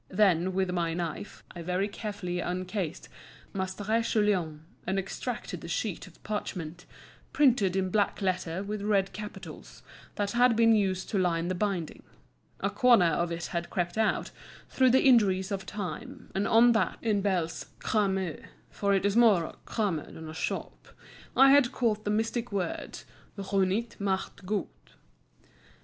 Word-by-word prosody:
Then, 185 -2 +3
with 190 -1 0
my 170 -2 -1
knife, 170 +3 -5
I 170 - -6
very 180 +3 0
carefully 200 -4 -5
uncased 180 -1 -3 0.5
Maistre 200 +4 -1
Guillaume, 185 -9 0 0.2
and 190 - 0
extracted 195 -2 -4
the - - -8
sheet 185 +2 -3
of 175 - -19
parchment, 180 -5 -5 0.5
printed 235 -10 +3
in 190 -1 0
black 205 0 +1
letter 185 -2 -1
with 205 0 -4
red 200 -2 +1
capitals, 210 0 -9 0.3
that 205 -1 -1
had 245 0 +4
been 230 0 +5
used 190 -3 +1
to 200 - +1
line 170 -1 +1
the - - 0
binding. 185 -3 -2 0.6
A - - 0
corner 240 -8 +5
of 170 +2 0
it 170 0 -3
had 170 0 -2
crept 175 -1 -2
out, 220 -1 0 0.4
through 260 -1 +4
the 260 +2 +4
injuries 200 -6 +4
of 190 -1 -3
time, 200 -4 -6
and 195 +1 0
on 235 +2 +6
that, 220 -5 +1
in 210 -3 +1
Bell's 180 -5 -1
"crame" 190 -6 0 0.3
(for 200 -1 +1
it 195 - +1
is 200 0 +2
more 220 -7 +6
a - - -7
crame 205 -7 0
than 160 +1 -9
a 155 - -7
shop), 175 - -4 0.5
I 270 +1 +8
had 275 -3 +5
caught 215 -4 0
the - - 0
mystic 225 +2 -1
words 190 -4 -4 0.3
Runjt 195 +3 -1
macht 190 -1 -2
Gunjt. 210 0 -4
195 Hz, 155 wpm, -29 LUFS, 180-215 Hz, 0.6 s, I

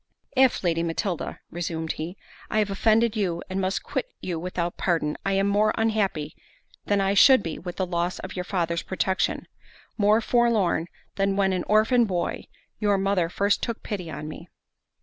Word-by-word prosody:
"If, 260 -4 +4
Lady 165 -2 +1
Matilda," 170 +1 -3
resumed 165 -2 -3
he, 170 +5 -6 0.3
"I - - -1
have 210 -2 +2
offended 220 +3 +3
you, 180 -5 -1
and 190 +1 -1
must 190 +1 -1
quit - - -3
you 175 -3 -3
without 175 0 -3
pardon, 165 -4 0
I 195 - 0
am 195 0 +2
more 205 +2 +2
unhappy 200 -9 0 0.5
than 205 -1 +2
I 195 0 +2
should 260 +2 +7
be 165 - -4
with 175 -1 -7
the 190 - -1
loss 175 0 -1
of 190 - -7
your 180 - -2
father's 170 -3 -1
protection—more 200 +2 -1
forlorn, 220 -9 +2 0.3
than 195 0 +1
when 195 -1 +2
an 180 - -2
orphan 220 +3 +4
boy, 180 -4 -2 0.3
your 205 -2 +2
mother 190 -3 +1
first 200 +3 +1
took 235 -2 -4
pity 180 -5 -4
on 150 0 -6
me." 165 +3 -9
190 Hz, 170 wpm, -25 LUFS, 170-210 Hz, 0.5 s, should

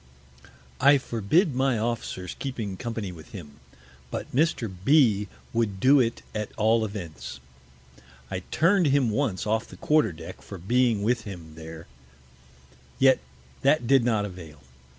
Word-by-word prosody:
I 140 +1 +6
forbid 135 - +1
my 130 -1 +1
Officers 110 -5 -3
keeping 115 -8 -4
Company 110 -2 -4
with 80 -2 -13
him; 75 -7 -10 0.5
but - - -6
Mr. 145 -5 +2 0.2
B 110 -7 +4
s - - -23 0.2
would 110 -4 0
do 135 +6 +6
it 115 -2 0
at 105 -1 -3
all 110 +1 +3
Events. 80 - -6 0.9
I 95 - -2
turn'd 175 +1 +3
him 135 -4 +3
once 105 -6 -1
off 110 +1 0
the - - -13
Quarter 150 - +2
Deck 80 +1 -10
for 100 - -9
being 115 +3 +1
with 115 +1 0
him 85 -6 -9
there, 80 +1 -10 1.1
yet 135 -1 +5 0.4
that 140 -2 +3
did 135 0 +4
not 110 -4 +1
avail. 85 -7 -10
110 Hz, 145 wpm, -26 LUFS, 95-130 Hz, 1.1 s, I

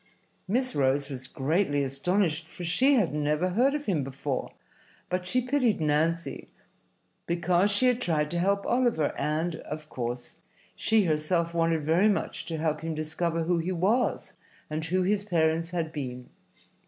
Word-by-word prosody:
Miss 255 +6 +1
Rose 140 +1 +1
was 130 -1 -6
greatly 145 +1 0
astonished, 160 +4 0
for 175 - -9
she 260 +12 +4
had 200 - +2
never 150 +4 0
heard 250 +10 +2
of 295 0 -4
him 165 -8 0
before, 135 0 -4 0.6
but 180 0 -2
she 255 +5 +2
pitied 250 -5 +1
Nancy 160 +2 0 0.8
because 175 +3 +2
she 205 +5 +1
had 250 -1 +3
tried 150 -6 0
to 175 - -1
help 200 +2 +1
Oliver, 240 - +1
and, 160 +2 -1
of 155 -1 -8
course, 120 0 -4 0.4
she 220 - +3
herself 165 +1 0
wanted 165 -2 +1
very 170 +8 +4
much 205 - -2
to 165 - -3
help 155 -1 -1
him 160 -1 -3
discover 165 +2 -1
who 170 +1 +1
he 170 +3 -2
was 195 +8 0 0.4
and 155 +1 -2
who 185 +3 +1
his 200 +2 +1
parents 165 -3 +1
had 165 -2 -3
been. 125 -4 -6
165 Hz, 160 wpm, -28 LUFS, 150-195 Hz, 0.8 s, she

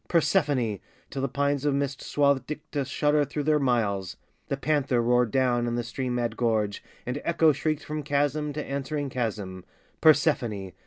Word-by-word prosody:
Persephone!" 145 - +2 0.3
till 135 - -3
the 135 - +1
pines 140 +1 0
Of 145 -2 +2
mist 140 -1 -2
swathed 140 -3 +1
Dicte 150 -2 -4
shuddered 145 0 +1
through 150 - -2
their 150 0 +3
miles, 105 -8 0 0.3
The 140 - -2
panther 140 -4 +1
roared 120 0 +3
down 120 -1 +1
in 120 - -1
the 120 - -1
stream 125 +2 -3
mad 120 -2 -1
gorge, 110 -4 0 0.2
And 125 +4 -3
Echo 165 -2 +4
shrieked 155 +2 -1
from 150 0 -4
chasm 145 +1 0
to 150 +1 -4
answering 140 +1 -3
chasm, 105 -7 -3 0.4
"Persephone!" 125 - +3
135 Hz, 165 wpm, -27 LUFS, 120-145 Hz, 0.4 s, Echo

